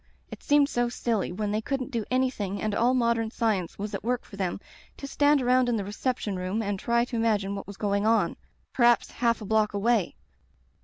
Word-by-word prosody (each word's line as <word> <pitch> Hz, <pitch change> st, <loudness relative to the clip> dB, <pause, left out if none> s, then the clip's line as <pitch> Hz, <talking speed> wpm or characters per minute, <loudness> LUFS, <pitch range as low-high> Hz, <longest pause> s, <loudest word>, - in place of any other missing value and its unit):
It -, -, -9 dB
seemed 290 Hz, -1 st, +4 dB
so 240 Hz, -3 st, 0 dB
silly, 230 Hz, -5 st, -1 dB
when 205 Hz, +3 st, -3 dB
they 215 Hz, +1 st, 0 dB
couldn't 270 Hz, +2 st, -3 dB
do 230 Hz, -4 st, -2 dB
anything 250 Hz, -6 st, -1 dB
and 215 Hz, -1 st, -2 dB
all 240 Hz, +4 st, +2 dB
modem 235 Hz, -2 st, +1 dB
science 215 Hz, -7 st, -1 dB
was 205 Hz, +1 st, -5 dB
at -, -, -4 dB
work 245 Hz, +2 st, -1 dB
for -, -, -12 dB
them, 190 Hz, -2 st, -2 dB, 0.4 s
to -, -, -7 dB
stand 285 Hz, 0 st, +2 dB
around 250 Hz, 0 st, +3 dB
in 240 Hz, -, +1 dB
the 205 Hz, -3 st, -2 dB
reception 210 Hz, -1 st, -2 dB
room 190 Hz, +5 st, -2 dB
and 200 Hz, -1 st, -2 dB
try 235 Hz, +2 st, +1 dB
to 245 Hz, -, -6 dB
imagine 210 Hz, -4 st, +1 dB
what 195 Hz, -, -6 dB
was 200 Hz, -1 st, -9 dB
going 200 Hz, 0 st, 0 dB
on 225 Hz, 0 st, +2 dB, 0.2 s
— -, -, -42 dB
^perhaps 240 Hz, -2 st, +3 dB
half 235 Hz, -2 st, 0 dB
a -, -, -6 dB
block 215 Hz, 0 st, +1 dB
away. 215 Hz, -2 st, +1 dB
225 Hz, 215 wpm, -27 LUFS, 205-245 Hz, 0.4 s, seemed